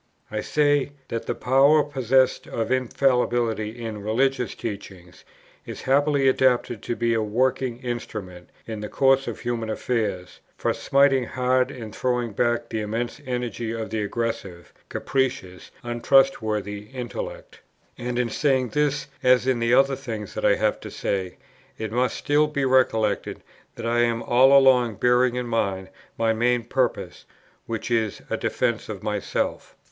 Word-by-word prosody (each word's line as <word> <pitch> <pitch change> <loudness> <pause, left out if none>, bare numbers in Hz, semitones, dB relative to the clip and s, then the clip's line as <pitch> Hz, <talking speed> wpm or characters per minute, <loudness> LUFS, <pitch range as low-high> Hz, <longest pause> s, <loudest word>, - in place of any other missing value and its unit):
I 105 0 -2
say, 145 0 +1 0.2
that 115 - -4
a - - 0
power, 140 +4 +4
possessed 130 -2 +1
of 115 +1 -3
infallibility 120 -3 0
in 110 -2 -5
religious 125 +4 0
teaching, 95 -4 -7 0.5
is - - -8
happily 140 +1 +3
adapted 125 -4 +2
to 120 - -3
be 115 0 +1
a 115 - +1
working 125 +3 0
instrument, 105 -7 -6 0.2
in 110 -2 -6
the 105 0 -6
course 135 0 +3
of - - -5
human 120 -2 -3
affairs, 105 -6 -2 0.2
for - - 0
smiting 135 -2 +3
hard 125 +1 +1
and 115 -6 -8
throwing 125 -2 -1
back 120 +3 0
the 110 - -2
immense 115 +3 -3
energy 120 -2 -3
of 110 -1 -5
the 110 - -1
aggressive, 105 -5 -4 0.2
capricious, 125 -9 -2
untrustworthy 115 -4 +1
intellect: 125 -1 -7 0.4
and 120 0 -4
in 125 -1 +1
saying 130 0 +1
this, 150 +1 0 0.2
as 125 0 +4
in 130 -2 +1
the 115 +1 +3
other 135 +1 +4
things 115 -7 -6
that - - -5
I - - +5
have - - 0
to - - -8
say, 95 -2 -3 0.4
it 110 -1 -4
must 125 +1 0
still 150 +1 +2
be 145 -2 -1
recollected 120 -5 +1 0.3
that - - -6
I 120 +1 +1
am 115 -1 +1
all 130 +3 +6
along 125 -4 +4
bearing 125 +2 +3
in 125 0 -2
mind 100 -5 -1 0.3
my 115 0 +2
main 120 +1 +1
purpose, 125 +1 -2 0.4
which 115 +1 -4
is 110 -3 0
a - - +2
defence - - -1
of - - -6
myself. - - -3
120 Hz, 150 wpm, -24 LUFS, 110-130 Hz, 0.5 s, all